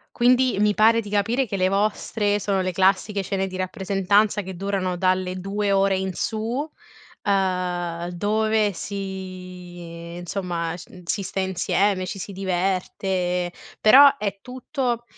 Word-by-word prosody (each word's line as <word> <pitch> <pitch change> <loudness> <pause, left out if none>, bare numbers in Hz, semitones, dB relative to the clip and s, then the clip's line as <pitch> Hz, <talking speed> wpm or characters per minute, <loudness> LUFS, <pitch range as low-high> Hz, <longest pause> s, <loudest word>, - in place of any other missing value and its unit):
Quindi, 250 -1 +4
mi 210 0 +3
pare 225 +2 +5
di 205 -2 -9
capire, 225 +6 +1
che 200 - -3
le 185 0 +2
vostre 205 +1 0
sono 195 -1 0
le 185 0 -1
classiche 195 +2 +2
cene 195 0 -1
di 185 0 -7
rappresentanza, 200 +2 +1
che 190 -1 -7
durano 190 -1 -1
dalle 185 0 0
2 200 +2 -2
ore 195 0 +3
in 190 0 -2
su, 215 +4 -2 0.8
uhm, 180 -3 -1
dove 215 +3 +1
si, 180 -3 -7
insomma 175 -2 -3
sc 170 - -13
n 180 - -12
si 200 - -1
sta 195 +1 -3
insieme, 190 +1 +1
ci 195 - -5
si 200 +2 -6
diverte; 185 -1 -1 0.3
però, 280 +6 +8
è 200 -5 -3
tutto, 250 -1 -3
195 Hz, 140 wpm, -23 LUFS, 185-205 Hz, 0.8 s, però